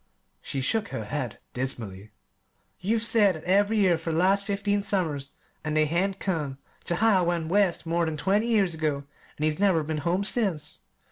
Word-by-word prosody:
She 135 - -4
shook 220 +10 0
her 110 - -5
head 130 -2 -4 0.2
dismally. 110 -6 -3 0.7
"You've 220 +4 0
said 210 -5 +4
that 155 - -9
ev'ry 200 +4 +2
year 185 -5 +3
for 165 0 -3
the 160 - -1
last 195 +3 +3
fifteen 205 0 0
summers, 160 -9 -2 0.3
an' 155 -1 -2
they 155 0 +4
hain't 185 +5 0
come 150 -8 -2 0.3
yet. 175 - 0
Jehiel 195 -5 +3
went 170 -2 -1
West 195 -2 +2
more 170 +1 +1
than 155 -1 -3
twenty 200 +8 +1
years 205 -7 +2
ago, 155 -3 -1 0.3
an' 150 - -4
he's 155 +1 0
never 190 -6 +3
been 155 0 -3
home 175 +6 0
since. 195 -9 0
175 Hz, 185 wpm, -26 LUFS, 150-200 Hz, 0.7 s, said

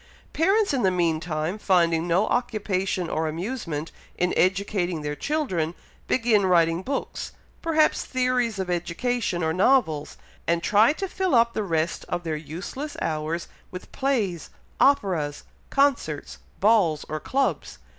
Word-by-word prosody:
Parents 395 +3 +2
in 265 - +1
the 190 - +4
meantime, 165 0 -1
finding 170 -4 +2
no 180 +5 +3
occupation 195 -7 -1
or 160 0 -1
amusement 165 - -4 0.3
in 180 0 +1
educating 185 -3 +1
their 150 0 -3
children, 185 - -1 0.3
begin 230 -4 +3
writing 170 -1 +3
books, 275 +7 -4 0.3
perhaps 315 -2 +2
theories 250 -4 0
of 190 -1 -2
education, 175 +3 -1
or 160 0 +1
novels; 180 - +2 0.3
and 170 0 +1
try 210 +4 +5
to 390 +5 -4
fill 370 -5 0
up 235 0 +4
the - - -1
rest 165 -4 -1
of 175 0 -2
their 160 -2 -2
useless 180 - -6
hours 160 +2 -2 0.2
with 180 - -9
plays, 215 - -1 0.3
operas, 180 - +2 0.3
concerts, 270 - 0 0.2
balls, 195 -8 +3
or 155 - -3
clubs. 195 - -1
185 Hz, 135 wpm, -25 LUFS, 165-245 Hz, 0.3 s, try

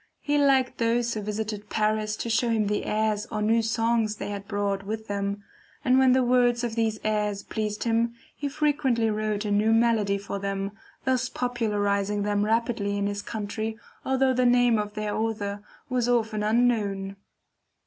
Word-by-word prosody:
He 290 0 +1
liked 270 -2 +3
those 235 0 +1
who 215 - -3
visited 210 0 -4
Paris 215 0 0
to 235 - -5
show 240 +1 +2
him 220 -2 +2
the 205 0 -1
airs 215 0 0
or 215 - -4
new 225 +2 +3
songs 225 -1 +1
they - - -5
had 200 -1 -6
brought 200 -1 -1
with 220 +2 -5
them, 200 0 -3 0.4
and 255 0 +5
when 260 -1 +5
the 260 0 +3
words 245 -1 +3
of 235 -2 -2
these 225 -2 0
airs 210 -2 0
pleased 210 -1 -3
him, 230 0 +1 0.2
he 285 - -3
frequently 275 -6 +1
wrote 215 0 -1
a 205 - -1
new 210 +2 +3
melody 225 -3 +3
for 200 0 -5
them, 195 0 -3 0.3
thus 260 -1 +1
popularizing 205 -4 0
them 205 0 +1
rapidly 220 -2 0
in 200 - 0
his 205 0 -2
country 220 +1 -4 0.3
although 265 0 +2
the 255 0 +2
name 245 -2 +4
of 210 0 -4
their 215 -1 -2
author 210 -2 -2 0.3
was 250 -2 0
often 220 -3 +1
unknown. 210 -4 +1
220 Hz, 175 wpm, -26 LUFS, 205-235 Hz, 0.4 s, and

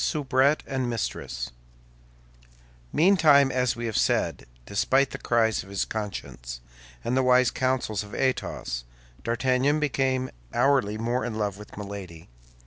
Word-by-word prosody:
SOUBRETTE 140 0 +2
AND 130 -3 -2
MISTRESS 60 - -3 1.4
Meantime, 155 -6 +5
as 125 -1 +1
we 120 0 -4
have 110 -2 -3
said, - - +1 0.2
despite 130 +7 +2
the - - -6
cries 115 -2 +2
of 100 - -13
his 100 -1 -1
conscience 75 - -5 0.4
and 125 - 0
the 130 - +4
wise 125 -1 +4
counsels 130 -5 0
of 105 0 -9
Athos, 95 - -1 0.4
D'Artagnan 130 +5 +1
became 130 -3 0 0.2
hourly 120 -5 +3
more 120 +3 -1
in 120 -3 -3
love 100 -2 -2
with 105 - -12
Milady. 100 -5 -8
125 Hz, 135 wpm, -26 LUFS, 105-130 Hz, 1.4 s, Meantime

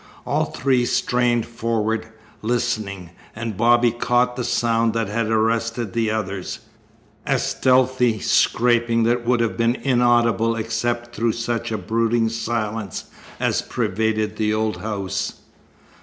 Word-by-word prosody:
All - - +1
three 130 -2 +1
strained 120 -1 +1
forward, 115 -1 -2 0.3
listening, 110 -6 -2 0.2
and 110 -1 -4
Bobby 120 +2 +4
caught 120 +1 +1
the 125 - -3
sound 115 -1 +1
that 115 -3 -1
had 110 +1 -1
arrested 115 0 0
the 115 -1 +1
others 100 -4 -3 0.7
a 135 - +3
stealthy 130 -2 +2
scraping 120 +2 +2
that 120 +1 +1
would 120 -1 +3
have 115 -1 -1
been 115 +1 +2
inaudible 120 -3 +2
except 120 +1 -2
through 115 +1 +1
such 115 -1 -3
a 110 - -1
brooding 115 +3 +1
silence 110 -3 -3 0.3
as - - +1
pervaded 110 +1 -1
the 105 -1 +1
old 110 0 0
house. 100 -4 -3
115 Hz, 125 wpm, -22 LUFS, 110-120 Hz, 0.7 s, Bobby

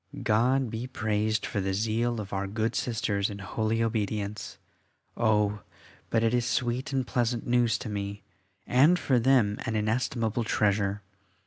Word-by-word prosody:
God 125 +3 +2
be 115 +3 -4
praised 110 -3 -1
for 100 - -2
the 95 0 -1
zeal 115 +3 0
of 100 -2 -6
our 100 0 -1
good 110 +3 -1
Sisters 105 -4 -1
in 100 - -6
holy 110 +3 -1
obedience. 105 -2 -2 0.6
Oh! 105 -2 +2 0.5
but 115 0 +2
it 115 +1 +2
is 120 -1 +2
sweet 120 +2 -1
and 135 -2 0
pleasant 120 -1 -1
news 120 -2 +2
to 110 - -7
me, 100 -1 -4 0.4
and 145 +8 +5
for 130 -7 +2
them 115 -4 +3
an 115 -3 -2
inestimable 115 +1 0
treasure. 100 -2 +1
110 Hz, 150 wpm, -28 LUFS, 105-120 Hz, 0.6 s, and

